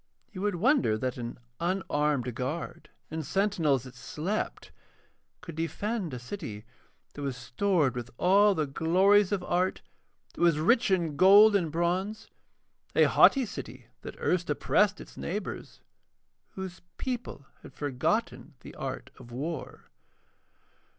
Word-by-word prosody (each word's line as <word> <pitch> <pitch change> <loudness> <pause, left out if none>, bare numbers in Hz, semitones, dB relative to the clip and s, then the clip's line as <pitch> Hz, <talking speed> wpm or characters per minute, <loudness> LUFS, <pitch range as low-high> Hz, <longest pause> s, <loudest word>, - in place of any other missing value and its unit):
You 185 - -7
would 205 -2 0
wonder 235 - +3
that 130 +3 -3
an 120 -1 -6 0.2
unarmed 150 -8 0
guard 135 +8 -5 0.2
and 160 0 -3
sentinels 160 - +1
that 130 -1 -11
slept 155 +10 -4 0.7
could 175 -2 -8
defend 180 +4 -2
a 125 - -5
city 120 - -7 0.5
that 145 - -8
was 135 -3 -3
stored 145 +4 +1
with 120 -1 -6
all 200 +2 +5
the 155 - 0
glories 185 +8 +3
of 195 -3 -1
art, 180 +1 0 0.5
that - - -8
was 170 -3 +4
rich 230 +10 +3
in 170 -6 0
gold 205 +4 +8
and 170 -6 +1
bronze, 180 +6 -2 0.6
a - - +6
haughty 270 -2 +5
city 200 - -9
that - - -8
had - - -13
erst 175 -2 +1
oppressed 155 +8 +2
its - - -12
neighbours, 200 +4 -5 0.7
whose 190 -1 -7 0.2
people 245 - -5 0.2
had - - -14
forgotten 140 -4 -2
the - - -11
art - - -6
of 120 - -13
war. 145 +4 -6
170 Hz, 135 wpm, -29 LUFS, 140-200 Hz, 0.7 s, gold